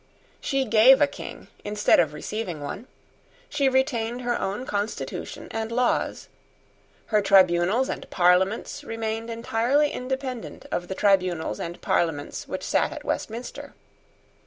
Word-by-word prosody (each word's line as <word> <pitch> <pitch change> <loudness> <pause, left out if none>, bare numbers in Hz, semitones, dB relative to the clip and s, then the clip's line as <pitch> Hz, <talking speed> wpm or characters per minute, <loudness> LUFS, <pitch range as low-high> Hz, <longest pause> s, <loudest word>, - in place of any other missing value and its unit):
She 270 -1 0
gave 240 +4 +7
a 290 - +6
King 285 - -9 0.2
instead 205 0 +3
of 160 -4 +3
receiving 180 +1 -5
one. 190 - -6 0.6
She 280 -2 +2
retained 250 -3 0
her 240 0 0
own 205 +7 -3
constitution 205 -2 -4
and 225 0 -3
laws. 245 +1 0 0.9
Her 210 - +5
tribunals 195 +4 +4
and - - -5
parliaments 190 +10 +2
remained 225 -2 -4
entirely 235 +5 +1
independent 255 -1 -5
of 175 - -2
the 190 - -4
tribunals 180 - +1
and 170 +1 -5
parliaments 155 -4 -1
which - - -5
sate - - +1
at - - -7
Westminster. 230 +3 -5
225 Hz, 130 wpm, -25 LUFS, 190-250 Hz, 0.9 s, gave